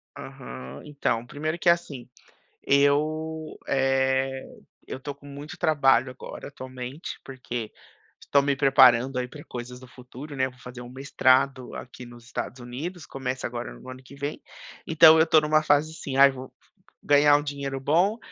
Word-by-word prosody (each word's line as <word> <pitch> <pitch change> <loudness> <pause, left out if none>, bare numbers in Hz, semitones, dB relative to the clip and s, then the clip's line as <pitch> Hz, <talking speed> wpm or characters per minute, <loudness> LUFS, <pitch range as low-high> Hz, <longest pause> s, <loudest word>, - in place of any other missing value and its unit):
Aham. 65 +2 -9
Então, 130 -5 -2
primeiro 155 +6 -4
que, 175 - +3
assim, 150 -8 0 0.6
eu, 155 +3 +1
eh, 135 0 +1 0.5
eu - - -6
tô 145 +2 -6
com 145 - -19
muito 145 +2 -9
trabalho 135 -5 +3
agora, 130 - -9
atualmente, 130 +2 -8
porque 120 -4 -6 0.5
estou 140 - +2
me 140 0 0
preparando 135 -2 +5
aí 125 - -3
pra 145 +4 -12
coisas 125 0 -8
do 130 - -14
futuro, 130 +4 -11
né, 130 0 +1
vou 130 -1 -15
fazer 125 0 -10
um 120 - -10
mestrado 130 0 +1
aqui 125 0 -9
nos 120 0 -14
Estados 125 +1 -5
Unidos, 145 +8 -7
começa 130 -1 -4
agora - - -6
no - - -12
ano 130 0 -9
que 135 +2 -14
vem, 140 +2 -5 0.5
então 160 0 +7
eu 160 - +6
estou 160 -1 +4
numa 155 0 +2
fase 150 +1 +2
assim: 140 -4 -6
"Ai 140 0 +8
vou 130 0 -10 0.5
ganhar 145 0 +5
um 145 - +1
dinheiro 140 -2 -4
bom 175 +10 +2
135 Hz, 165 wpm, -25 LUFS, 125-145 Hz, 0.6 s, Ai